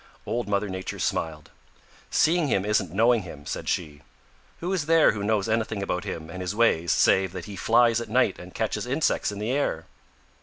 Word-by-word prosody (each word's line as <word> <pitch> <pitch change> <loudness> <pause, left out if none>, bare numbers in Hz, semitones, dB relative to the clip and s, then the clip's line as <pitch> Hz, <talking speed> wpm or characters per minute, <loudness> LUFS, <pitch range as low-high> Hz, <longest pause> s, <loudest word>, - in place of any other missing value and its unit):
Old 120 -1 -2
Mother 100 0 0
Nature 95 -1 -5
smiled. 75 -2 -3 0.6
"Seeing 165 -1 +3
him 100 -6 +1
isn't 105 -5 +1
knowing 115 +4 +3
him," 75 -6 -10
said - - -4
she. 75 -5 -3 0.6
"Who 180 +3 -2
is 160 -6 -1
there 165 -1 +5
who 105 - -5
knows 105 -1 +1
anything 110 -2 -1
about 90 -2 -2
him 80 -1 -5
and 95 +3 -7
his 90 +2 -3
ways 85 -7 +2
save 95 -2 +3
that 90 -2 -6
he 105 - -8
flies 115 +2 +3
at 115 - -7
night 125 +4 +2
and - - -10
catches - - -2
insects - - 0
in 100 - -7
the 105 +4 -2
air?" 130 - -1
105 Hz, 195 wpm, -25 LUFS, 90-115 Hz, 0.6 s, there